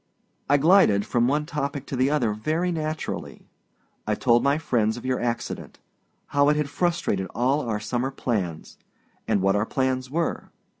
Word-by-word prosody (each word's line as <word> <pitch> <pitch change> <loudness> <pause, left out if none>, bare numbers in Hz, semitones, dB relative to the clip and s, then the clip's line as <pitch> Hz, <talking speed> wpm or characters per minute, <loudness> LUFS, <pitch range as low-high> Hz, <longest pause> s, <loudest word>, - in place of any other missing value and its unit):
I 145 - +5
glided 150 - +5
from 120 0 +1
one 150 +3 +1
topic 140 -3 -3
to - - -5
the 130 +2 +2
other 125 -8 +1
very 155 +11 -1
naturally. 155 -1 -4 0.6
I - - +1
told 120 0 +3
my 140 +1 +3
friends 115 -8 0
of 120 - -9
your 130 -1 0
accident; 120 -1 -4 0.5
how 145 0 +3
it 150 - +3
had 150 -1 -1
frustrated 170 - 0
all 130 +6 +2
our 105 -1 -1
summer 120 +4 -2
plans, 100 -11 -3 0.5
and 95 - +1
what 95 +1 +3
our 105 +2 0
plans 130 -1 -1
were. 165 +4 -2
130 Hz, 165 wpm, -25 LUFS, 115-150 Hz, 0.6 s, I